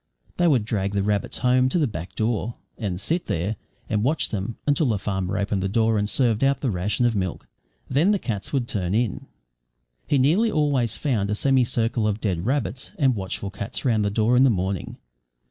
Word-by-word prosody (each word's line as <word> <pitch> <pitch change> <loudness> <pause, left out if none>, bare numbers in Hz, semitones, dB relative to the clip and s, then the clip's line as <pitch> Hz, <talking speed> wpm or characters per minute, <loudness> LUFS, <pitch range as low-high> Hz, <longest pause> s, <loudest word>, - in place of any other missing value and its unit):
They 175 - +3
would 130 -9 +3
drag 100 -3 -1
the 100 -1 +1
rabbits 105 0 -1
home 125 0 +3
to 155 - +1
the 160 - +3
back 90 - -6
door, 115 +1 -1 0.2
and 95 -5 -3
sit 165 - -1
there 90 +7 -1 0.3
and 105 -1 0
watch 145 +6 +1
them 105 +2 -4
until 145 +1 +2
the 110 -4 +1
farmer 95 -1 -2
opened 100 -1 -1
the 95 - -1
door 110 +1 +2
and 105 0 -1
served 115 -2 +2
out 140 0 +2
the 130 - 0
ration 100 +6 0
of 120 -2 +2
milk. 95 -3 -3 0.4
Then 150 +9 +2
the 210 - +3
cats 105 - -4
would 130 -4 0
turn 95 -3 -1
in. 115 -3 -1 0.8
He 145 - +2
nearly 165 - +3
always 140 -7 +1
found 110 -9 0
a 105 - 0
semi 130 +2 +3
circle 115 -2 0
of 105 0 -1
dead 95 -3 -2
rabbits 130 - -2
and 135 -6 +3
watchful 95 0 -4
cats 100 +8 -5
round 110 -4 +2
the 100 - +1
door 110 +4 +2
in 125 - +6
the 135 - +6
morning. 95 -3 -2
110 Hz, 210 wpm, -24 LUFS, 100-130 Hz, 0.8 s, in